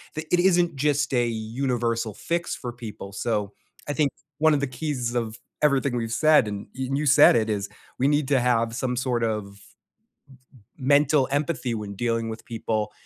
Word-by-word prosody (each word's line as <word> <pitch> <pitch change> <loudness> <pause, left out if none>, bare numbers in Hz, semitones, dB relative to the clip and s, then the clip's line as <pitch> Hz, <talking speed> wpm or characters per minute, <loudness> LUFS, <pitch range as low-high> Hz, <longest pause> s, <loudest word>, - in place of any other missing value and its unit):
the 155 +1 -4
it 175 - +5
isn't 175 -3 +3
just 145 0 +1
a 120 -1 +2
universal 115 0 -2
fix 170 - -2
for 125 - -6
people. 110 -4 -9
So, 105 0 -2 0.4
I - - 0
think 145 -1 +2 0.3
one 160 0 +5
of 140 - +1
the 140 - 0
keys 125 -2 -3
of 115 -2 -2 0.2
everything 140 -3 +2
we've 115 -1 -3
said, 155 -4 +4
and 100 -1 -5
y 130 -1 -2
you 145 +2 0
said 145 0 +7
it, 110 -1 +1
is 100 -1 -1 0.3
we 135 - +3
need 145 -1 +2
to 140 -2 +4
have 115 -2 +1
some 125 0 -1
sort 125 -2 -1
of 110 -1 0 1.4
m 130 - -5
mental 145 -1 +4
empathy 140 -4 -1
when 105 -2 -5
dealing 115 +1 -1
with 110 0 -7
people, 110 -2 -2
125 Hz, 185 wpm, -25 LUFS, 115-145 Hz, 1.4 s, said